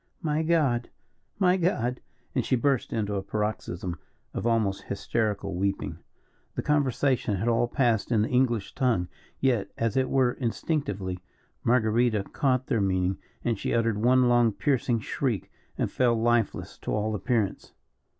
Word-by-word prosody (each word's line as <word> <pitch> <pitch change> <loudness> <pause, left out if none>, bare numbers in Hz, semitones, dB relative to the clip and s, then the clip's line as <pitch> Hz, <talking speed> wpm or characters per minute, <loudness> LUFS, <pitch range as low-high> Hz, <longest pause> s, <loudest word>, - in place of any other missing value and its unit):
"My 155 -1 +1
God! 150 -8 +1 0.5
my 185 -2 +4
God!" 125 -9 0 0.3
and - - +1
she - - +1
burst 135 +1 +1
into 105 -2 -1
a 100 - -1
paroxysm 95 -4 -3 0.3
of - - -2
almost 110 -4 +1
hysterical 100 -1 -1
weeping. 100 +2 -2 0.6
The - - -2
conversation 135 -6 +1
had 105 +5 -2
all 120 0 +3
passed 120 -4 +1
in 110 -3 +3
the - - 0
English 120 -5 +1
tongue, 120 -10 +1 0.3
yet, 120 -7 +1
as 115 -2 0
it 130 -1 +2
were, 130 -2 +3
instinctively, 105 - -2 0.4
Marguerita 115 -2 +2
caught 130 -2 +1
their 115 - +1
meaning, 95 -1 +1 0.2
and 115 -4 0
she - - -1
uttered 115 -2 +1
one 125 +2 +4
long, 120 -2 +4
piercing 120 +2 +1
shriek, 115 -5 -2 0.3
and - - -1
fell 120 -2 +3
lifeless 120 -2 0
to - - -4
all 105 +1 0
appearance. 110 -1 -1
115 Hz, 150 wpm, -27 LUFS, 105-130 Hz, 0.6 s, my